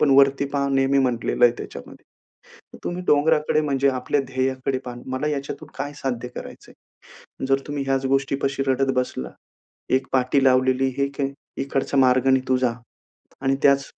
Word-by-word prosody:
पण 145 - +4
वरती 140 0 +5
पहा 140 0 +1
नेहमी 135 0 +2
म्हटलेलं 125 -1 +1
आहे 120 - +6
त्याच्यामध्ये. - - -10 0.7
तर - - -10
तुम्ही 175 +1 -3
डोंगराकडे 150 +1 +3
म्हणजे 140 -2 +1
आपल्या 130 +2 0
ध्येयाकडे 130 0 -1
पहा. 120 -1 -6
मला 130 +3 -2
ह्याच्यातून 140 -2 -4
काय 145 0 -4
साध्य 125 -3 -3
करायचंय? - - -10 0.8
जर 135 0 +3
तुम्ही 145 -1 -3
ह्याच 135 0 0
गोष्टीपाशी 135 0 0
रडत 135 0 +2
बसला. 125 - -2 0.6
एक 130 +1 +2
पाटी 130 +1 +2
लावलेली 130 0 +3
एक 140 +1 -3
आहे, 135 0 -1 0.3
इकडचा 135 0 -2
मार्गाने 130 0 +4
तू 130 - +3
जा 125 -2 +1 0.7
आणि 135 0 +2
त्याच 140 0 +4
135 Hz, 155 wpm, -23 LUFS, 130-140 Hz, 0.8 s, आहे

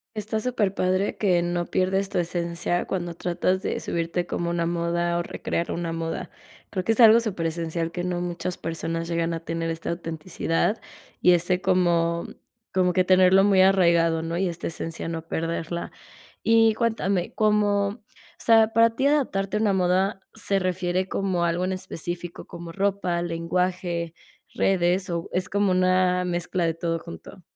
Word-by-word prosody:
Está 215 +1 -2
superpadre 200 -5 0
que 180 -4 +2
no 175 0 -1
pierdes 190 +1 0
tu 195 - -3
esencia 170 0 -1
cuando 175 -2 -3
tratas 180 +2 -1
de - - -2
subirte 170 +1 -2
como 170 -1 -2
una 170 -1 0
moda 170 0 0
o - - -1
recrear 170 - -3
una 170 -1 -3
moda. 165 0 -4 0.4
Creo 185 -3 -2
que 225 - +2
es 225 - -6
algo 225 0 +8
superesencial 165 -5 -2
que 175 0 -4
no 180 -1 -2
muchas 175 0 -3
personas 165 0 -3
llegan 170 0 -1
a 165 - -4
tener 165 0 -3
esta 165 +1 -3
autenticidad 165 +4 -2 0.4
y 180 - +6
ese 180 +1 +1
como 170 -2 +2 0.5
como 180 -1 +2
que 185 - +3
tenerlo 185 +1 +5
muy 195 -2 +5
arraigado, 170 -4 +4
¿no? 165 +1 -3
Y 185 -1 +1
esta 170 - -5
esencia 165 0 -5
no 165 -1 -4
perderla. 165 +1 -3 0.5
Y 225 -1 +5
cuéntame, 200 -6 0
como 210 -2 +2
o 215 +3 -10 0.5
sea, 225 -1 +6
¿para 230 0 +5
ti 270 +3 +2
adaptarte 210 -9 +1
a - - 0
una 210 -3 +2
moda 190 +2 +1
se 200 -3 0
refiere 185 0 -1
como 190 -3 -1
algo 170 +2 0
en 190 - -1
específico, 175 -1 -6
como 170 -1 -9
ropa, 195 -2 0
lenguaje, 170 0 -2 0.4
redes 185 0 +1
o 170 -1 -3
es 185 +1 -1
como 200 -1 +1
una 185 0 +3
mezcla 175 0 -1
de 165 - +1
todo 165 0 -2
junto? 85 - -11
180 Hz, 165 wpm, -25 LUFS, 170-195 Hz, 0.5 s, algo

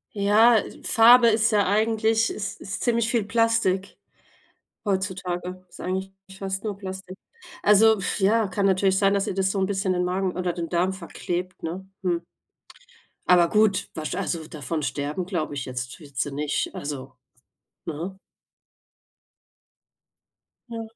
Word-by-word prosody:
Ja, 215 +3 +5
äh, - - -5
Farbe 235 +1 +7
ist 220 +1 +3
ja 205 -2 +3
eigentlich 220 +2 +2
ist 200 -2 -5
ist 195 - -5
ziemlich 235 -1 +1
viel 235 -4 +1
Plastik, 225 -3 +1 0.9
heutzutage. 185 -2 -3
Ist - - -15
eigentlich 190 +1 -3 0.2
fast 195 0 -4
nur 210 -2 -3
Plastik. 190 -1 -8 0.5
Also 220 +2 +6
f 195 - -2
ja, 210 +2 +3
kann 195 +1 -1
natürlich 190 0 +3
sein, 195 0 +3
dass 200 -1 0
ihr 190 - -3
das 190 0 +1
so 195 - -2
'n 190 - +1
bisschen 195 -2 0
den 180 0 0
Magen 185 0 -1
oder 180 -1 -1
den 170 -1 -4
Darm 180 +2 +1
verklebt, 180 0 -5
ne? 185 +4 -5
Hm. 175 -2 -1 1.0
Aber 175 -2 +5
gut, 210 -2 +2
was 155 -1 -4
also 160 -3 -3
davon 155 0 -4
sterben, 145 +6 -3
glaube 170 -6 -2
ich 140 -2 -4
jetzt 125 +3 -6
wird 140 -3 -15
sie 140 +2 -1
nicht. 145 +1 -2
Also, 135 -2 -6 0.7
ne? 170 +5 -5 2.5
Ja. 230 -1 -5
190 Hz, 150 wpm, -25 LUFS, 175-210 Hz, 2.5 s, Farbe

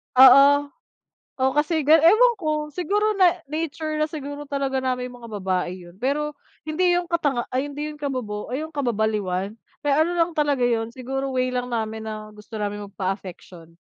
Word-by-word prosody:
Oo, 280 +2 +8 0.7
oh, 265 0 +3
kasi 315 +1 +2
ewan 345 +11 +6
ko 305 -2 -2
siguro 415 +5 +1
na 360 -1 +5
nature 310 0 -3
na 305 - +2
siguro 290 -2 -6
talaga 275 -1 -1
namin 250 -1 -2
yung 245 - -12
mga 230 - -9
babae 185 -1 -1
'yon. 175 +2 -15
Pero 295 +4 -1 0.3
hindi 350 +3 +2
yung 350 - -3
katanga 285 -8 0
ay 260 +3 -1
hindi 295 +2 -4
yung 300 - -11
kabobo 250 -8 -4
o - - -3
yung 315 +3 -4
kababaliwan, 215 -6 -1 0.3
eh, 280 - +4
ano 320 +4 +2
lang 335 +1 +3
talaga 290 -4 +1
'yon 230 -1 0
siguro 270 +1 -3
way 255 0 +1
lang 250 0 -1
namin 220 -1 -3
na 215 -1 -6
gusto 210 +1 -14
naming 205 0 -3
magpa-affection. 185 -4 -6
270 Hz, 175 wpm, -23 LUFS, 220-305 Hz, 0.7 s, Oo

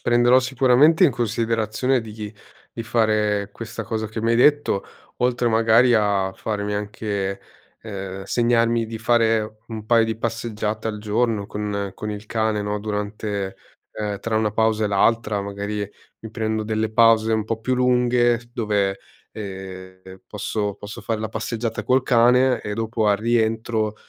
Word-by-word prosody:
prenderò 120 +1 +4
sicuramente 130 +5 +4
in 160 - +5
considerazione 115 +2 0
di 105 -1 -8 0.4
di 115 - -3
fare 110 -3 +1
questa 115 0 -7
cosa 110 -1 -3
che 110 +1 -5
mi 115 +1 +1
hai 115 - +3
detto, 145 -6 +3 0.4
oltre 125 0 +1
magari 115 +2 +4
a 100 -3 +1
farmi 105 -1 -3
anche, 100 -1 -3 0.4
ehm 95 -3 -6
segnarmi 115 +1 +2
di 110 0 -6
fare 110 -2 +1
un 110 -2 -7
paio 115 -1 +4
di 110 -1 -3
passeggiate 110 -2 -3
al 105 -1 -3
giorno 105 0 0
con 100 -1 -3
con 105 - -5
il 105 0 -7
cane, 110 -1 0
no, 105 0 -2
durante, 105 -1 -4 0.3
ehm 105 -2 -4
tra 110 -1 -1
una 110 -1 +1
pausa 110 0 +1
e - - +2
l'altra, 105 +1 +2
magari 100 +1 -4 0.3
mi 110 - -9
prendo 110 -1 -2
delle 110 0 -2
pause 115 -1 +4
un 110 -1 +1
po' 110 +1 -3
più 130 +2 0
lunghe 125 -1 +3
dove, 100 -4 0 0.3
ehm, 95 -2 -9
posso 105 -1 -3
posso 105 +3 -9
fare 110 +1 -2
la 110 0 -3
passeggiata 115 0 -3
col 130 +4 +2
cane 125 +1 +4
e 105 - -5
dopo 115 0 -1
al 100 - +4
rientro, 110 -1 0
110 Hz, 155 wpm, -22 LUFS, 105-115 Hz, 0.4 s, in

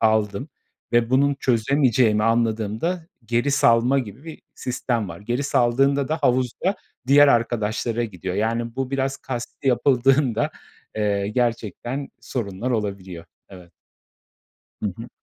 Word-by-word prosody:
aldım 110 +3 +1 0.4
ve 120 0 +3
bunun 140 +2 +3
çözemeyeceğimi 125 -3 +2
anladığımda 115 - 0 0.2
geri 120 +4 0
salma 125 -1 +4
gibi 125 +4 -6
bir 160 - -10
sistem 120 -4 -2
var. 85 +2 -9
Geri 120 +6 -2
saldığında 135 +1 +2
da 155 +1 -1
havuzda 130 - +1 0.3
diğer 145 +2 +7
arkadaşlara 115 -1 0
gidiyor, 95 -4 -5
yani, 115 +3 -1
bu 135 -1 -2
biraz 135 0 -1
kasti 130 +2 -5
yapıldığında 130 0 +2 0.5
eee, 100 -2 0
gerçekten 120 +3 -2
sorunlar 110 0 -4
olabiliyor. 100 -6 -3 0.2
Evet. 90 -3 -14 1.1
Hı 105 - +1
hı. 115 - -8
120 Hz, 120 wpm, -23 LUFS, 110-135 Hz, 1.1 s, diğer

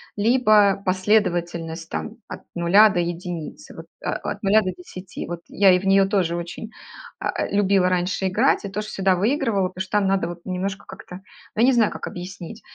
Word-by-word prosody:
либо 215 -3 +4
последовательность 175 -4 0
там 225 +1 -5
от - - -8
0 195 +5 +5
до 180 - -1
1 170 - -5
вот 165 - -10 0.2
от, 205 +1 -3
э, - - -26
0 210 +3 +4
до 185 -2 -3
10. 180 +1 -9
Вот 175 0 -5
я 195 -1 +4
и 180 - +4
в 195 - -8
неё 195 0 +5
тоже 185 -4 0
очень, 175 +6 -6 0.5
а, - - -2
любила 195 -2 +2
раньше 185 +1 0
играть 215 +3 +2
и - - -4
тоже 210 +2 -5
всегда 190 -1 +1
выигрывала, 210 -3 0
потому 185 0 -7
что 185 - -6
там 200 - +2
надо 190 -3 +1
вот 175 0 -8
немножко 190 +2 -4
как-то, 180 - -11 0.4
ну 220 - 0
я - - +5
не 265 - +5
знаю, 225 -3 +3
как - - -6
объяснить. 180 +4 -8
190 Hz, 195 wpm, -22 LUFS, 175-205 Hz, 0.5 s, 0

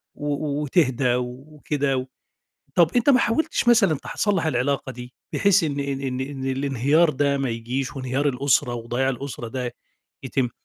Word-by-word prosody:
و 145 0 -2
وتهدا 130 -5 +2
وكده. 135 +1 -3 0.7
طَب 170 -2 +5
أنت 245 +4 +3
ما 255 - +5
حاولتِش 240 +1 0
مثلًا، 200 -9 +5
تح - - -9
صلّح 195 -6 +1
العلاقة 135 -1 0
دي 125 0 -10 0.2
بحيث 200 -3 +4
إن 145 -2 -1
إن 140 -1 -2
إن 130 -1 -3
إن 135 -1 -5
الإنهيار 140 +4 +2
ده 140 0 +1
ما 135 -2 -1
يجيش 125 +4 -3
وإنهيار 135 +2 -1
الأسرة 125 -2 +1
وضياع 120 +3 -1
الأسرة 130 -2 -5
ده 125 -1 -4 0.5
يتم، 130 -1 0
135 Hz, 150 wpm, -23 LUFS, 130-150 Hz, 0.7 s, طَب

